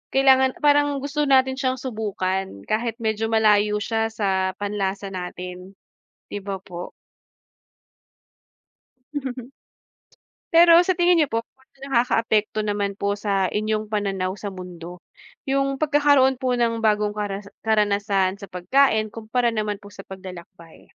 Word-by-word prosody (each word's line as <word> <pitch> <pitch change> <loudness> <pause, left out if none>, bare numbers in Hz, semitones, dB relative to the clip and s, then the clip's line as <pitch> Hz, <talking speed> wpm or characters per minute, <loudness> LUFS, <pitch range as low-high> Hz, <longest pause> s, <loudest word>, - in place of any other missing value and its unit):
kailangan 265 -1 +5
parang 290 -1 +3
gusto 295 +1 -1
natin 265 -1 +4
siyang 260 -2 -1
subukan 195 - -3
kahit 230 +1 -1
medyo 220 0 -1
malayo 210 -1 +3
siya 225 +1 -1
sa 190 -3 0
panlasa 200 -1 -3
natin, 180 +1 -7 0.6
'di 205 - -3
ba 195 -1 -4
po? 175 -1 -8 2.2
Mhm. 260 -3 -5 1.0
Pero 335 0 +8
sa 370 - +2
tingin 350 0 +4
niyo 295 - +2
po, 230 - +1
kung 265 +3 -25 0.2
nakakaapekto 225 -4 +1
naman 205 -1 -1
po 200 0 -1
sa 195 -3 0
inyong 215 0 -2
pananaw 195 -2 -2
sa 205 - -7
mundo 180 -1 -9 0.4
yung 275 0 0
pagkakaroon 285 -3 +3
po 255 -2 0
ng 230 -1 +1
bagong 210 -1 +1
karas 205 -1 -5 0.2
karanasan 200 -2 +1
sa 200 - -9
pagkain 215 +4 +2
kumpara 230 +2 -1
naman 210 -2 -3
po 205 - -12
sa 195 -1 -12
paglalakbay? 180 -3 -12
215 Hz, 130 wpm, -23 LUFS, 195-255 Hz, 2.2 s, Pero